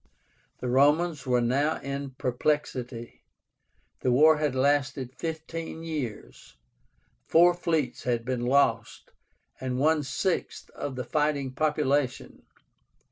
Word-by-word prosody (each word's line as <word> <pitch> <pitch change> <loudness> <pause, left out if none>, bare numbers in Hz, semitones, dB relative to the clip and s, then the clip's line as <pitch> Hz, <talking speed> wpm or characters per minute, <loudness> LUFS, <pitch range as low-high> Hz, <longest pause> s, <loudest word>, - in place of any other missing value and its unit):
The 125 - -3
Romans 145 +3 +2
were 125 -1 +3
now 140 +6 +1
in 140 -1 -5
perplexity. 125 -2 -2 0.8
The 125 - +1
war 155 +5 +6
had 150 -3 -1
lasted 135 -1 +1
fifteen 160 0 -5
years. 130 - -6 0.7
Four 175 +2 +6
fleets 165 -5 -1
had 120 -2 -1
been 130 -1 -2
lost, 140 +2 +1 0.5
and 130 -1 -3
one 155 +3 +3
sixth 145 +7 -3
of 140 -2 -5
the 125 -1 -4
fighting 145 0 0
population. 145 -3 -1
140 Hz, 110 wpm, -27 LUFS, 125-155 Hz, 0.8 s, war